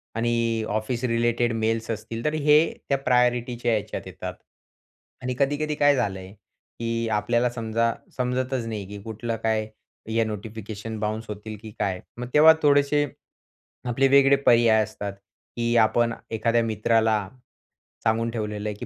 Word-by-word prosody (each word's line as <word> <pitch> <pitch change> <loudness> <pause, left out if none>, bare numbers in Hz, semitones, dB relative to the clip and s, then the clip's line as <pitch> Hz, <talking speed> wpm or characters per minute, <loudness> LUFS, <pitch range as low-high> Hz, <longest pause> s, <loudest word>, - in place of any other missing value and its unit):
आणि 115 -1 0
office 110 +4 -2
related 120 0 +1
mails 115 0 -1
असतील, 115 +1 -5
तर 150 - +1
हे 150 -1 +5 0.3
त्या 140 - +3
प्रायोरिटीच्या 125 -2 +1
ह्याच्यात 105 -3 -2
येतात. - - -6 0.9
आणि 125 0 -2
कधी-कधी 145 +2 0
काय 145 -1 +4
झालंय 95 -6 -3
की 115 +3 -6
आपल्याला 120 +3 +1
समजा, 115 0 0 0.2
समजतच 125 0 -1
नाही 105 -3 -4
की 100 0 -8
कुठलं 115 +1 -4
काय, 110 -1 +1 0.5
या 115 0 +3
नोटिफिकेशन 110 0 -6
बाउन्स 110 +1 -2
होतील 105 +1 -7
की 110 -1 -9
काय, 95 -2 -1 0.2
मग 125 0 -5
तेव्हा 155 +2 +8
थोडेसे 145 0 +4 0.8
आपले 135 +3 +3
वेगळे 140 0 +6
पर्याय 115 -2 +5
असतात, 105 -2 -6 0.4
की 120 0 0
आपण 115 +1 +3 0.2
एखाद्या 115 +1 +1
मित्राला 110 -1 +1 0.8
सांगून 115 +1 +1
ठेवलेलं 105 -2 -3
आहे, 105 - -5
की 115 - -7
115 Hz, 140 wpm, -25 LUFS, 110-125 Hz, 0.9 s, तेव्हा